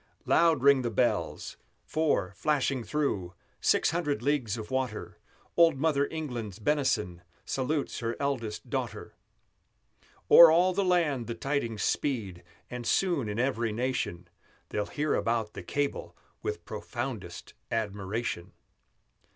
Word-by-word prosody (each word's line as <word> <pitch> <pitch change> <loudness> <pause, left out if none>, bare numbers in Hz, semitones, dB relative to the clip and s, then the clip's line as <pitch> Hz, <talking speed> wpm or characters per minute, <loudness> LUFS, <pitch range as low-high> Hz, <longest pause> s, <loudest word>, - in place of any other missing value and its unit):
Loud 165 -5 +4
ring 140 -1 +6
the 120 - -1
bells, 110 - -1 0.3
for, 155 -12 0
flashing 140 -4 0
through 100 -10 -2 0.2
Six - - +3
hundred 150 -8 -1
leagues 130 -6 0
of 110 +2 -7
water, 120 -5 -3 0.4
Old 165 -4 +5
Mother 145 -1 +2
England's 120 - -5
benison 110 - 0 0.2
Salutes 140 +2 -2
her 115 0 -2
eldest 130 -7 -2
daughter! - - -4 1.2
O'er 170 -1 +11
all 175 +3 +4
the 200 +2 +1
land 165 - +1
the 115 - -4
tidings 115 -4 -2
speed, 105 -11 -1 0.3
And 125 -1 -6
soon, 170 - +1
in 105 - -3
every 120 -3 0
nation, 115 -7 -2 0.4
They'll 105 -1 -2
hear 150 0 -1
about 115 -2 0
the - - -7
cable 145 0 -3 0.2
with - - -4
Profoundest 110 -9 -6 0.2
admiration! 105 -3 -3
130 Hz, 125 wpm, -29 LUFS, 110-145 Hz, 1.2 s, O'er